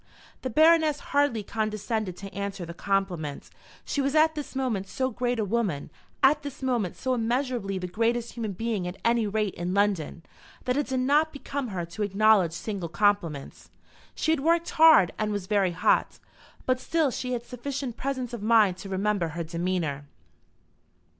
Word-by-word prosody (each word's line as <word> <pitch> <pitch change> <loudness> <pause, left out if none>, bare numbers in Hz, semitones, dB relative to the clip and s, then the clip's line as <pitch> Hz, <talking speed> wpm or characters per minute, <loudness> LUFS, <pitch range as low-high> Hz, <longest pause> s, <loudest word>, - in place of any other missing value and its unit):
The 260 - -3
Baroness 315 +2 +4
hardly 285 -7 +2
condescended 215 -2 -2
to 195 0 -9
answer 200 -1 -4
the 170 - -7
compliment. 175 -6 -2 0.3
She 285 - -1
was 275 +2 0
at 315 +1 +5
this 295 -3 -7
moment 235 -8 -1
so 260 +4 -2
great 245 +1 -1
a 220 - 0
woman, 200 -9 -1 0.3
at 290 +3 +5
this 285 -2 -8
moment 240 -9 0
so 260 -1 -1
immeasurably 240 -4 -1
the 180 - -4
greatest 230 +5 0
human 220 -4 -4
being 215 -2 -2
at 180 +2 -6
any 230 -2 +3
rate 210 -1 -1
in 175 +2 -3
London, 195 -5 0 0.4
that 250 - +1
it 290 0 0
did 260 -1 -1
not 295 +4 +3
become 280 -1 -4
her 185 -5 -4
to 170 +6 -8
acknowledge 205 -3 +4
single 185 0 -4
compliments. 170 -7 0 0.5
She 315 - +1
had 320 - +2
worked 335 +4 +1
hard 315 - +6
and 215 0 0
was 205 -3 -3
very 195 -3 +1
hot, 165 - +2 0.5
but 255 0 +1
still 315 -1 +1
she 250 +1 -3
had 240 -1 -3
sufficient 260 0 -5
presence 260 -2 -3
of 235 - -5
mind 215 -4 +4
to 195 - -8
remember 195 -2 0
her 170 +1 -4
demeanour. 165 -3 -2
220 Hz, 175 wpm, -27 LUFS, 190-260 Hz, 0.5 s, hard